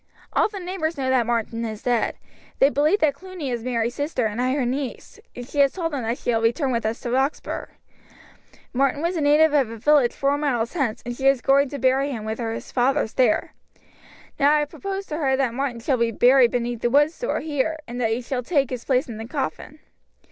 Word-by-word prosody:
"All - - +3
the 410 -2 -7
neighbours 355 -3 -3
know 260 -1 0
that 245 -3 +2
Martin 230 -1 -1
is 220 -1 -5
dead; 240 -2 +1 0.4
they 275 - +4
believe 300 +8 +3
that 300 -2 +3
Cluny 355 -4 -7
is 235 -2 -3
Mary's 235 -1 -1
sister 285 -3 -2
and 220 +3 -2
I 255 +1 +1
her 275 -3 0
niece, 265 - -4 0.2
and 245 0 -7
she 290 - -4
has 275 -1 +4
told 330 -4 -3
them 275 - -2
that 230 +2 -2
she - - -1
shall 225 -1 +1
return 240 +5 +1
with 235 -2 0
us 225 +2 -3
to 240 - -4
Roxburgh. 265 +4 -1 1.0
Martin 275 +3 +1
was 345 +2 0
a 325 - -1
native 300 +1 +4
of 275 -6 +3
a 230 - -7
village 280 0 +4
four 280 +1 0
miles 245 -6 -1
hence, 270 -10 -2
and 240 0 -4
she 265 +2 0
is 275 -1 +4
going 275 +2 +3
to 285 - -5
bury 265 +2 +2
him 225 -6 -5
with 220 +2 -4
his 225 -1 -4
fathers 260 -1 +1
there. 250 -5 +2 0.9
Now 285 0 +5
I - - +3
have 295 - -3
proposed 395 0 -5
to 305 - -3
her 270 -4 +1
that 260 -4 0
Martin 255 -2 -3
shall 260 +2 +1
be 235 -1 +1
buried 245 +2 +5
beneath 240 -1 -2
the 240 - +1
wood 290 +4 +4
store 485 +8 -3
here, 310 +1 -1
and 245 +1 -5
that 225 -1 +1
you 245 - -5
shall 250 +1 -2
take 275 -1 0
his 250 -2 -4
place 255 -1 +1
in 230 -3 -7
the 225 +1 -7
coffin." 290 +2 -4
265 Hz, 235 wpm, -23 LUFS, 235-290 Hz, 1.0 s, Now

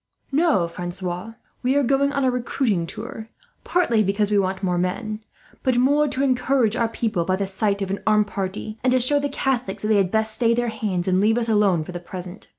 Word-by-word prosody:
"No, 285 - +2
Francois, 180 +4 -5 0.3
we 255 +2 +1
are 285 - +3
going 275 +2 +2
on 280 -1 -1
a 260 - +3
recruiting 235 -7 -1
tour: 220 +5 -7 0.4
partly 240 -12 +2
because 200 +1 0
we 205 - +4
want 190 0 -1
men, 190 +5 -1 0.4
but 255 -2 +1
more 285 +4 +3
to 270 -1 -1
encourage 255 -3 +2
our 230 -2 +1
people 220 -6 -1
by 185 +2 0
the 200 +1 -1
sight 200 +1 -1
of 190 - -4
an 195 - -2
armed 210 -1 +4
party, 205 +2 -5
and 255 - +3
to 255 - +4
show 285 +4 +3
the 285 0 -1
Catholics 255 -8 -2
that 210 - -1
they 215 - +4
had 195 -2 +2
best 220 +1 0
stay 230 0 +2
their 240 0 0
hands, 205 -5 -2
and 185 0 +3
leave 220 +3 +3
us 235 -1 0
alone 200 -6 +3
for 170 - -8
the 175 - -5
present. 180 +2 -9
215 Hz, 220 wpm, -23 LUFS, 190-250 Hz, 0.4 s, we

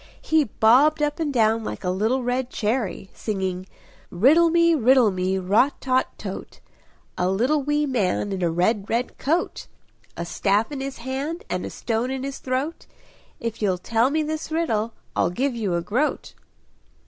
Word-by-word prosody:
He 315 -2 +2
bobbed 270 +8 +4
up 295 +2 -1
and 310 -3 -1
down 225 -3 +2
like - - -6
a 180 - 0
little 220 +7 0
red 245 +1 -1
cherry, 215 -5 -2
singing 190 -3 -3 0.4
"Riddle 295 - +5
me, 335 0 +4
riddle 255 -5 +4
me, 185 +1 -1
rot 205 +9 +2
tot 260 0 0
tote! - - -7 0.6
A 180 - +2
little 250 +10 +1
wee 295 +2 +1
man, 205 -6 0
in 190 -1 -3
a 175 - +2
red 195 +5 0
red 235 +2 -2
coat! 325 +6 -1 0.5
A 170 - -3
staff 205 - 0
in 280 -2 -4
his 270 0 -5
hand, 275 - -4
and - - -2
a - - -6
stone 230 +2 -2
in 265 0 -3
his 275 0 -5
throat; 265 +6 -3 0.5
If 230 -1 -4
you'll 190 -3 +1
tell 230 +6 +1
me 310 +2 0
this 310 +1 -4
riddle, 230 -9 0 0.2
I'll - - +2
give 255 +9 -1
you 210 -7 -1
a 170 - -1
groat." 250 - -1
245 Hz, 170 wpm, -23 LUFS, 205-285 Hz, 0.6 s, Riddle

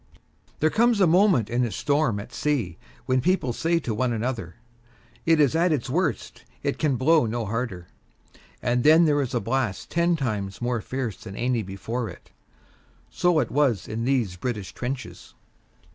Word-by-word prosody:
There 155 +1 +3
comes 235 -1 +3
a 190 - +6
moment 175 - +4
in 120 +2 0
a 120 - 0
storm 140 -3 0
at 110 +4 -10
sea 115 - -1 0.3
when 130 0 +2
people 170 -8 +1
say 165 +6 +1
to 115 - -3
one 120 +3 0
another, 115 -6 -3 0.7
"It 165 -1 +5
is 145 0 +3
at 170 +2 +3
its 135 -4 -1
worst; 160 - -2 0.2
it - - -1
can 150 -4 +1
blow 145 +1 +3
no 115 +1 -2
harder," 105 -5 -3 0.8
and 120 0 +1
then 160 +3 +6
there 145 -2 +3
is 125 -2 -3
a - - +2
blast 120 -6 -2
ten 170 0 +2
times 105 -9 -3
more 120 -1 -1
fierce 125 -6 -4
than 95 - -10
any 120 0 0
before 110 +5 -4
it. - - -14 0.8
So 175 -2 +2
it 130 -7 +1
was 130 -7 +1
in 110 +2 -3
these 120 -9 0
British 105 -2 -4
trenches. 125 +1 -6
125 Hz, 175 wpm, -25 LUFS, 115-155 Hz, 0.8 s, a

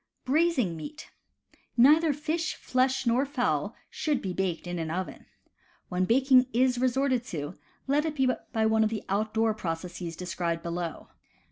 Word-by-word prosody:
Braising 275 - +2
Meat. 305 - -9 0.3
— - - -51 0.3
Neither 300 +6 +6
fish, 315 +3 -2
flesh 260 +1 0
nor 240 +3 +3
fowl 275 -3 -1 0.2
should 295 -4 0
be 190 -2 -4
baked 180 -3 -2
in 175 0 -4
an 160 -1 -3
oven. 185 +3 -5 0.6
When 180 0 +1
baking 255 +3 +5
is 250 +1 +3
resorted 255 0 +1
to, 145 - -6 0.3
let 290 +3 +2
it 310 -1 -2
be 265 -2 +2 0.2
by 220 -2 +1
one 220 0 +3
of 215 - +2
the 220 -1 -4
outdoor 220 +2 +1
processes 175 -3 -5
described 170 -1 -3
below. 170 -1 -4
230 Hz, 155 wpm, -28 LUFS, 180-270 Hz, 0.6 s, Neither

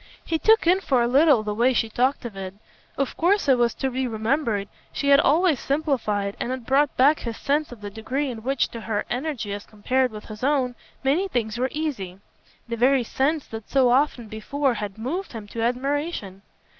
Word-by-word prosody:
He 325 -1 -1
took 445 +2 +4
in 360 +3 +4
for 255 -9 +2
a - - +2
little 275 -2 +5
the 210 -1 -2
way 240 +4 +3
she 230 - +1
talked 250 +4 0
of 225 -4 -6
it. 190 0 -6 0.4
Of 275 -2 -1
course, 370 +1 +2
it 260 -3 +4
was 240 -1 +2
to 265 -1 -2
be 260 +1 -1
remembered, 220 -2 -1 0.2
she 280 - -1
had 280 0 +7
always 315 -1 +3
simplified, 235 -9 -1
and 245 - -2
it 255 -2 -5
brought 275 +3 +2
back 285 +4 +5
his 230 -2 -5
sense 295 +1 0
of 235 -3 -11
the 205 -1 -6
degree 255 +7 -2
in 225 -2 -7
which, 265 +3 0
to 230 - -8
her 210 -1 -2
energy 245 -5 -3
as 205 0 -5
compared 255 +5 0
with 215 -1 -9
his 215 +2 -10
own, 265 -3 +1 0.3
many 305 +9 +2
things 235 - -2
were 260 +1 +1
easy; 260 - -4 0.5
the 235 0 -3
very 255 +2 +4
sense 280 +6 0
that 225 -2 -8
so 260 -3 +4
often 255 -3 +1
before 265 +6 -1
had 210 -3 -5
moved 305 - -4
him 220 -3 -7
to 230 - -5
admiration. 250 - -2
255 Hz, 205 wpm, -24 LUFS, 220-285 Hz, 0.5 s, had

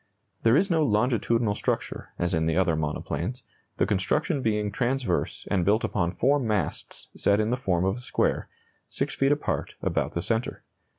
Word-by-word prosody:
There 115 +4 +5
is 190 +3 +2
no 165 -1 +3
longitudinal 115 -2 +2
structure, - - -2
as 90 +1 -1
in 80 -1 +1
the 80 +1 +1
other 90 -3 +3
monoplanes, 80 - -3 0.3
the - - +3
construction 140 - +1
being 105 -3 0
transverse 120 -4 -1
and 95 -4 +2
built 105 +5 +2
upon 85 -4 0
four 140 +10 +2
masts 105 - -3
set 100 +1 +3
in 110 +1 +1
the - - +2
form 95 -8 0
of 95 +4 0
a - - -8
square, 125 - 0 0.4
6 - - -2
feet 135 +1 +2
apart, 145 0 -1
about - - 0
the 85 - -2
centre. 115 +1 -2
105 Hz, 175 wpm, -26 LUFS, 90-125 Hz, 0.4 s, There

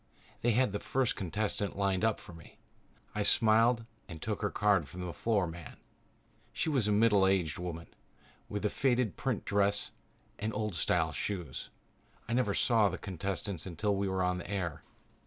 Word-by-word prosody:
They 120 0 +3
had 125 -1 +3
the 100 - -2
first 130 -2 0
contestant 100 +1 -2
lined 100 -1 +1
up 110 -2 +2
for 90 - -11
me. 85 -1 -14 0.6
I 105 - -1
smiled 115 +3 +4 0.2
and 80 - -8
took 105 +5 -3
her 105 - +1
card 100 -8 +2
from 90 0 -6
the 85 - -4
floor 100 +6 +1
man. 85 -1 -8 0.7
She - - -1
was 130 -8 +2
a - - +2
middle 105 -2 +5
aged 90 -6 +1
woman 85 -2 -5 0.6
with 105 +1 -3
a - - +3
faded 125 - +1
print - - -2
dress 100 0 +1 0.5
and 110 +1 -2
old 105 -2 -1
style 80 - +1
shoes. 90 -9 -4 0.6
I 115 - -2
never 120 -5 +2
saw 110 -4 +4
the - - -4
contestants 95 -1 -3
until 100 +4 0
we 100 0 0
were 95 -1 0
on 90 0 0
the 85 - -8
air. 90 -6 -2
100 Hz, 175 wpm, -32 LUFS, 90-110 Hz, 0.7 s, middle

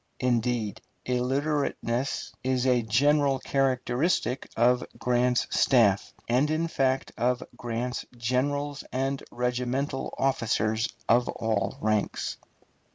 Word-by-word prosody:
Indeed, 120 -4 0 0.2
illiterateness 130 0 -1
is 130 0 +1
a 125 -2 +4
general 140 +5 +3
characteristic 130 +1 0
of 125 +2 +4
Grant's 125 0 +2
staff, 105 -7 +3 0.2
and 130 +5 +2
in 160 +2 0
fact 135 -4 0
of 125 +1 +1
Grant's 120 +1 -3
generals 140 +4 -1
and 135 +1 -1
regimental 125 +3 -2
officers 115 -4 +1 0.2
of 120 +2 +3
all 105 -3 -1
ranks. 110 -1 -1
125 Hz, 95 wpm, -27 LUFS, 120-135 Hz, 0.2 s, a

